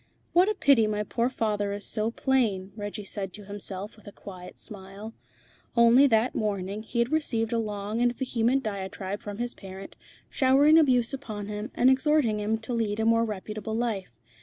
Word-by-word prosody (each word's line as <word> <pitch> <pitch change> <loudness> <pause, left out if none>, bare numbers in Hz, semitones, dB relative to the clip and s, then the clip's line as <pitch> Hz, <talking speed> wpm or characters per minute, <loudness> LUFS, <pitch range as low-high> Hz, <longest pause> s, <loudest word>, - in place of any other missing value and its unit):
"What 360 +4 +5
a 430 - 0
pity 270 - +4
my 210 0 -1
poor 235 +3 0
father 210 -5 -1
is 205 0 -5
so 215 0 0
plain," 230 -7 0
Reggie 205 0 -6
said 195 -2 -5
to 210 -1 -9
himself 200 0 -5
with 215 - -19
a - - -7
quiet 185 -3 -11
smile. 200 +1 -9 0.6
Only 235 +4 +7
that 225 0 +2
morning 200 -1 -2
he 225 +2 -7
had 235 +3 +2
received 235 -8 0
a 230 - +1
long 210 +1 -3
and 245 0 +4
vehement 255 0 +1
diatribe 195 -1 -4
from 205 -1 -7
his 240 +1 -3
parent, 195 0 -10 0.3
showering 285 +4 +5
abuse 255 -5 +3
upon 215 -7 -5
him, 210 +3 -5
and 250 - +3
exhorting 265 -4 +3
him 215 +2 0
to 235 +2 -5
lead 220 -2 -1
a 220 - +1
more 230 0 +4
reputable 215 +1 -5
life. 225 -5 -2
220 Hz, 185 wpm, -27 LUFS, 205-245 Hz, 0.6 s, Only